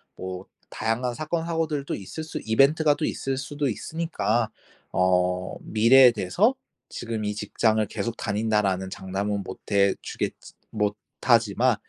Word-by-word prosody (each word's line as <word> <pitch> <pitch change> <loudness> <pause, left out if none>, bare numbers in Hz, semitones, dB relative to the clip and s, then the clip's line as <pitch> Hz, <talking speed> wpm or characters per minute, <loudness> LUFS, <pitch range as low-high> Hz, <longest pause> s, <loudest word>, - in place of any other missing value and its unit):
뭐 95 0 -6 0.2
다양한 120 +2 -1
사건 160 +4 -2
사고들도 160 -4 -2
있을 100 +11 -7
수 160 - -5
이벤트가 145 +6 +4
또 155 - -2
있을 135 -1 -2
수도 145 +1 -2
있으니까 125 -5 -1 0.4
어 90 0 +1
미래에 120 +4 +6
대해서 145 - +1 0.3
지금 115 -2 -4
이 105 0 -1
직장을 110 +1 +1
계속 110 +3 -4
다닌다라는 105 -3 0
장담은 100 +2 -3
못 95 - -8
해 100 -1 +4
주겠지 - - -5 0.2
못 105 -1 0 0.3
하지만 120 0 +3
110 Hz, 295 characters per minute, -25 LUFS, 100-135 Hz, 0.4 s, 미래에